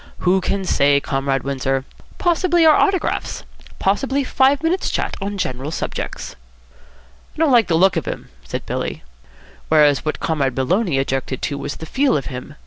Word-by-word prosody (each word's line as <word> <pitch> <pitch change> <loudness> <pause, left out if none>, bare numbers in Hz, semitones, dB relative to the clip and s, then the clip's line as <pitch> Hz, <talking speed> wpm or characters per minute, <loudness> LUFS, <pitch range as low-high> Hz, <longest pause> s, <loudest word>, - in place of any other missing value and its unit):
"Who 185 +1 +3
can 195 +1 -2
say, 140 -4 +3
Comrade 135 -1 -1
Windsor? 135 -1 -1 0.3
Possibly 345 -1 +2
our 310 - +8
autographs. 390 -3 0 0.3
Possibly 270 +8 0
five 270 +3 +2
minutes' 345 +4 +1
chat - - -2
on 200 +1 -3
general 130 -5 -3
subjects." 160 - -5 1.0
"I - - -19
don't 315 -2 +3
like 235 -3 +5
the 165 - +2
look 190 +3 +4
of - - -2
him," - - -5
said - - -5
Billy. - - -4 0.7
"Whereas 150 -3 +4
what 155 - -2
Comrade 140 -5 0
Maloney 170 - +1
objected 135 -1 -2
to 140 - -2
was 140 - -4
the 160 - -8
feel 265 - +2
of 140 - -4
him. 130 +4 -8
160 Hz, 165 wpm, -20 LUFS, -, 1.0 s, our